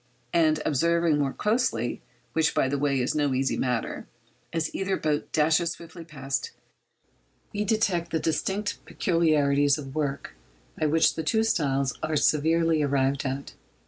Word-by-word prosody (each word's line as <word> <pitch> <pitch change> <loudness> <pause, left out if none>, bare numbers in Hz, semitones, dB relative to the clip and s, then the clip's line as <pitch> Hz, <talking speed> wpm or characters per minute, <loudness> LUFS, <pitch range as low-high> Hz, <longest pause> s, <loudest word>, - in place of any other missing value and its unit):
And 155 -2 +3
observing 170 +1 +2
more 140 -2 +1
closely—which, 210 - -1
by - - +2
the 140 +1 -1
way, 140 -1 +1
is 125 - 0
no 145 -3 +1
easy 135 +1 0
matter—as 120 +4 -4
either 195 0 -1
boat 150 -1 -1
dashes 160 +2 +2
swiftly 170 0 -11
past, 140 -4 -4 1.0
we 210 0 -1
detect 195 -6 +1
the 165 - 0
distinctive 195 +6 -2
peculiarities 145 -5 +2
of 135 -3 -8
'work' 140 -3 -3 0.4
by 155 - 0
which 160 +2 +3
the - - -3
two 220 +8 +1
styles 140 - 0
are 155 - -1
severally 160 +2 +2
arrived 140 0 +1
at. 135 +1 -5
155 Hz, 140 wpm, -26 LUFS, 140-170 Hz, 1.0 s, And